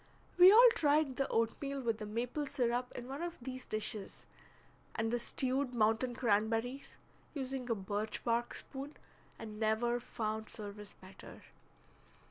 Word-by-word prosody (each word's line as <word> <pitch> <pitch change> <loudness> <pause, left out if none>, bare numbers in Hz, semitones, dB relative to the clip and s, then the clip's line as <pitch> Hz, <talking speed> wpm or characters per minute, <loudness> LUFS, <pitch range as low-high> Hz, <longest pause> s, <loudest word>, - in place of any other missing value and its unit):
We 365 +2 +11
all 475 +4 +9
tried 290 -3 +2
the 275 - +1
oatmeal 275 +5 -1
with 230 -4 -1
the 210 - -5
maple 245 +7 -2
syrup 245 -1 0
in 245 0 -6
one 275 +4 -5
of 345 -1 -4
these 255 +1 -7
dishes, 215 -1 -4 0.7
and 225 0 0
the 240 - +1
stewed 255 +2 -1
mountain 225 +2 +2
cranberries, 225 +3 0 0.4
using 265 -2 -4
a 230 - +2
birch 205 +2 -3
bark 235 0 0
spoon, 275 +2 -7 0.4
and 215 -1 -8
never 225 +2 +1
found 220 -2 -4
service 210 -1 -7
better. 190 0 -13
240 Hz, 140 wpm, -34 LUFS, 220-265 Hz, 0.7 s, We